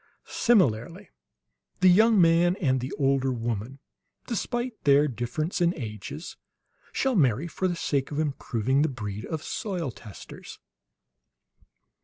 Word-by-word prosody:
Similarly 180 - +1 0.7
the 185 - +6
young 215 +4 +6
man 170 +1 +4
and 135 -9 +1
the 130 +3 -5
older 135 -1 +1
woman, 115 +1 -4 0.5
despite 240 0 -3
their 145 +1 +5
difference 150 - -3
in 175 +1 +2
ages, 110 - -7 0.5
shall 265 -1 0
marry 135 - +2
for 185 +2 -2
the 175 - -1
sake 140 -5 -1
of 145 - -5
improving 135 -3 0
the 155 - +2
breed 105 -4 -6
of 160 -2 -5
soil 180 - -3
testers." 105 -5 -11
145 Hz, 125 wpm, -26 LUFS, 125-175 Hz, 0.7 s, the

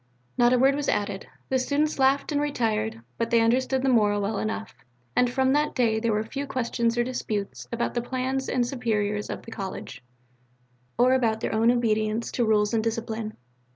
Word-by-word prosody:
Not 240 0 +4
a 250 - +4
word 265 +2 +4
was 290 0 -1
added: 205 -1 -1 0.2
the 260 - +2
students 290 +3 0
laughed 275 +3 +3
and 290 -1 +1
retired, 225 -6 -1 0.2
but 230 0 0
they 235 -1 +4
understood 260 +3 +2
the - - +1
moral 210 -4 +3
well 200 +1 -1
enough, 220 0 -3 0.4
and 250 - +3
from 265 +1 +2
that 300 +1 +1
day 225 -3 +2
there 230 0 0
were 215 0 +1
few 275 +5 -5
questions 235 -2 -1
or 240 - +3
disputes 220 -5 -4
about 235 0 -1
the 240 - 0
plans 260 +2 -2
and 250 -1 +1
superiors 210 -5 -1
of - - -5
the 230 - -11
college, 190 - -6 0.9
or 250 +1 +5
about 225 -4 +1
their - - -2
own 225 +2 +3
obedience 220 -2 +1
to 240 - 0
rules 210 0 +2
and 220 -1 +1
discipline. 225 -1 -3
235 Hz, 190 wpm, -26 LUFS, 220-260 Hz, 0.9 s, or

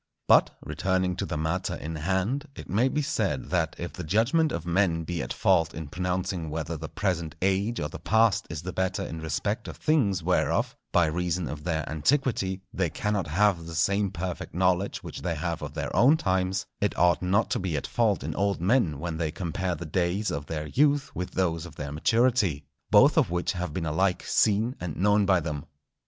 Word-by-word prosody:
But, - - +6
returning 95 -1 0
to - - -2
the - - -3
matter 80 +4 -1
in 80 +1 -6
hand, 95 - -1
it - - -9
may 115 +8 +2
be 150 +2 -1
said, - - -1
that - - 0
if 85 - -5
the 90 - -6
judgment 115 - +2
of 85 - -4
men 85 -2 +1
be 85 +1 -3
at - - -5
fault 80 0 +2
in 80 -3 -6
pronouncing 90 -1 -2
whether 80 +1 -3
the 80 0 -6
present 85 -5 -2
age 100 +5 +1
or 75 - -1
the 75 - -9
past 110 -2 +2
is 80 -1 -5
the 90 0 -5
better 95 0 -1
in 80 - -6
respect 80 -2 -2
of - - -8
things 105 - +1
whereof, 90 +2 +1 0.2
by 85 - +4
reason 85 +1 -1
of 75 0 -6
their 80 -3 -1
antiquity, 95 - 0
they 95 -3 0
cannot 105 -2 -1
have 90 +1 +2
the 85 - -7
same 100 +5 +2
perfect 90 -2 -5
knowledge 90 +1 +1
which - - -7
they - - -2
have - - -3
of - - -6
their - - -3
own 140 +6 +6
times, 95 -4 0
it 105 - 0
ought 90 0 +4
not 95 +5 +1
to - - +1
be 90 -6 -2
at - - -3
fault 110 -4 +1
in - - -3
old 100 -2 0
men 90 - +2
when 80 +2 -4
they 80 -1 -1
compare 90 +2 -2
the 90 - -7
days 90 +6 0
of 70 0 -4
their 75 -2 -3
youth 145 - +1
with 90 +2 -3
those 85 -3 -1
of 85 - -13
their 70 -1 -5
maturity, 110 - +2 0.2
both - - +6
of - - +2
which 90 0 0
have 90 -3 -4
been 80 +2 -3
alike 90 +4 +1
seen 110 +4 +2
and 85 -4 -4
known 105 +1 +3
by 95 -2 +4
them. 75 -3 -4
90 Hz, 205 wpm, -27 LUFS, 80-100 Hz, 0.2 s, But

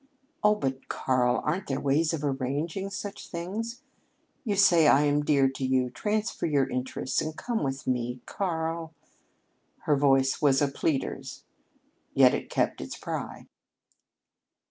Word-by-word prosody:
"Oh, 210 0 +5
but, 135 -9 -3
Karl, 125 -1 +1
aren't 180 +6 -1
there 135 0 -1
ways 150 +3 +2
of 160 -3 -3
arranging 145 +7 -2
such 200 0 -6
things? 220 - -5 0.6
You 210 -5 -1
say 175 -5 +5
I 145 +1 +6
am 145 0 +2
dear 140 -2 +4
to 135 0 -6
you 130 -1 +1
transfer 215 -1 -1
your 140 -3 +2
interests 130 0 -2
and 155 0 -5
come 235 -2 -2
with 135 -1 -3
me 125 0 -1
Karl!" 165 -3 -3 0.9
Her 150 - +2
voice 135 -1 +3
was 140 -3 +4
a 145 - +2
pleader's, 140 0 -3 0.7
yet - - +6
it - - -3
kept - - 0
its - - -6
pride. - - -5
145 Hz, 145 wpm, -27 LUFS, 135-175 Hz, 0.9 s, I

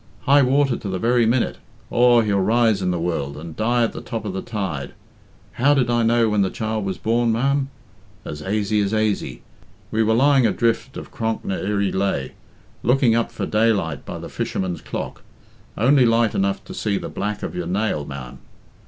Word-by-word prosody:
High 140 0 +5
water 135 -1 +2
to 100 - -6
the 95 - -2
very 120 +3 +2
minute 120 +1 0 0.3
aw, 120 -1 +5
he'll 105 -3 +1
rise 110 +1 +2
in 90 - 0
the 90 -1 -1
world, 75 -5 -2
and 80 +1 -8
die 120 +4 +1
at 115 - -1
the - - -7
top 110 -2 -5
of 100 - -3
the 95 - -3
tide. 95 - -4 0.6
How 145 +4 +3
did 125 -3 +1
I 120 0 +2
know 115 0 +3
when 105 -1 +2
the 95 - +2
child 110 -1 -3
was 95 - -3
born, 115 +1 +1
ma'am? 135 +4 +1 0.6
As 75 - -6
aisy 105 +3 0
as 100 +2 0
aisy. 105 - -1 0.5
We 110 - +1
were 110 0 +3
lying 135 -1 +4
adrift 115 +3 0
of - - -8
Cronk 115 -1 -3
ny 95 - -2
Irrey 100 0 -1
Lhaa, 95 -9 -1 0.5
looking 125 -1 +3
up 115 0 0
for - - -4
daylight 105 - +1
by - - -6
the - - -7
fisherman's 90 -2 -3
clock. - - -6 0.6
Only 130 +2 +4
light 115 -1 +2
enough 100 0 0
to - - -9
see 100 -2 -1
the - - -5
black 105 +1 -4
of - - -4
your 90 -1 -4
nail, 95 -4 -1
ma'am. 70 -3 -8
110 Hz, 195 wpm, -22 LUFS, 95-120 Hz, 0.6 s, High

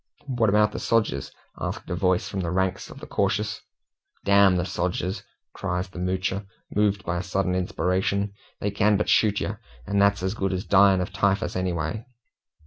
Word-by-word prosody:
"What 120 -6 +1
about 105 0 +4
the - - -5
sogers?" 105 - 0 0.3
asked - - -4
a - - 0
voice 90 0 +1
from 100 - -4
the 85 -3 -2
ranks 95 +1 -1
of - - -11
the - - -8
cautious. 105 +1 -1 0.6
"D 100 - 0
the 95 -3 +5
sogers!" 90 +1 -2 0.3
cries 90 -1 -3
the 90 - -9
Moocher, 95 +2 -1 0.3
moved 105 -1 +1
by 90 0 -1
a - - -1
sudden 95 +1 -1
inspiration. 95 +2 0 0.3
"They 105 - -1
can 105 0 +3
but 105 - -1
shoot 105 -2 +4
yer, 105 +1 -3 0.3
and 100 0 +1
that's 100 -1 +3
as 95 +1 0
good 95 -3 -1
as 95 0 -3
dyin' 95 -1 +5
of 90 - -4
typhus 100 -2 +1
anyway!" 90 +3 -2
95 Hz, 180 wpm, -25 LUFS, 90-100 Hz, 0.6 s, the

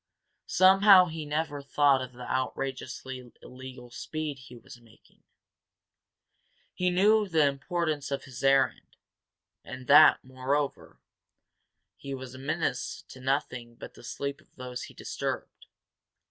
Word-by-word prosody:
Somehow 190 0 +7
he 160 -3 -6
never 145 -1 -2
thought 140 -1 +3
of 130 -1 -7
the 125 0 -9
outrageously 130 -1 -4
illegal 125 -1 -11
speed 155 +1 -5
he 130 -1 -13
was 120 +1 -14
making. 115 -1 -24 1.5
He 180 0 0
knew 210 +4 +3
the 160 -5 +3
importance 150 +1 -2
of 140 -1 -3
his 130 -1 -10
errand, 135 -1 +2 0.7
and 130 0 -9
that, 150 +4 +7
moreover, 130 +2 -3 1.0
he 140 -1 -6
was 130 -1 -9
a 130 - -10
menace 140 -2 -2
to 130 - -12
nothing 125 -3 -2
but - - -10
the - - -15
sleep 140 +4 -5
of - - -30
those 125 -1 -6
he - - -14
disturbed. - - -5
135 Hz, 130 wpm, -28 LUFS, 130-155 Hz, 1.5 s, Somehow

